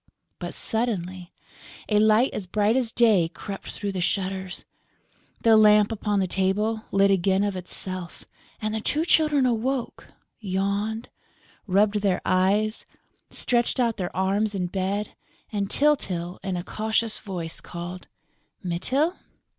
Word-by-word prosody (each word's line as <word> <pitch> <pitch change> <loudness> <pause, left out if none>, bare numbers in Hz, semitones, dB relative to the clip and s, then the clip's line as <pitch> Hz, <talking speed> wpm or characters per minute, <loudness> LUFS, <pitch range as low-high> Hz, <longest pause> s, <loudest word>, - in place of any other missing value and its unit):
But - - -5
suddenly 185 -6 -2 0.6
a 210 -1 +3
light 220 +4 +4
as 190 - -5
bright 210 +4 +2
as 250 -4 +1
day 215 -9 +4
crept 195 +2 -8
through 205 -1 -4
the 185 -2 -3
shutters, 190 0 -2 0.8
the 225 -1 +6
lamp 210 0 +6
upon 210 -2 0
the 190 - +2
table 200 +4 0
lit 195 0 +4
again 190 +1 +2
of 205 -2 -1
itself 185 0 -5 0.3
and 215 0 -2
the 220 - -2
two 305 +8 0
Children 305 -5 +3
awoke, 245 +1 -1 0.3
yawned, 200 +2 -2 0.6
rubbed 205 +2 +3
their 195 -3 +1
eyes, 205 +4 +1 0.4
stretched 240 +1 0
out 235 -3 +1
their 180 -1 -4
arms 200 +2 +1
in 185 -2 -1
bed 195 +3 -2 0.4
and 200 -2 -2
Tyltyl, 185 - +1
in 190 -2 -2
a 175 - -4
cautious 220 +2 -1
voice 175 -5 -5
called: 175 +1 -7 0.6
"Mytyl?" 260 - 0
205 Hz, 135 wpm, -25 LUFS, 185-220 Hz, 0.8 s, the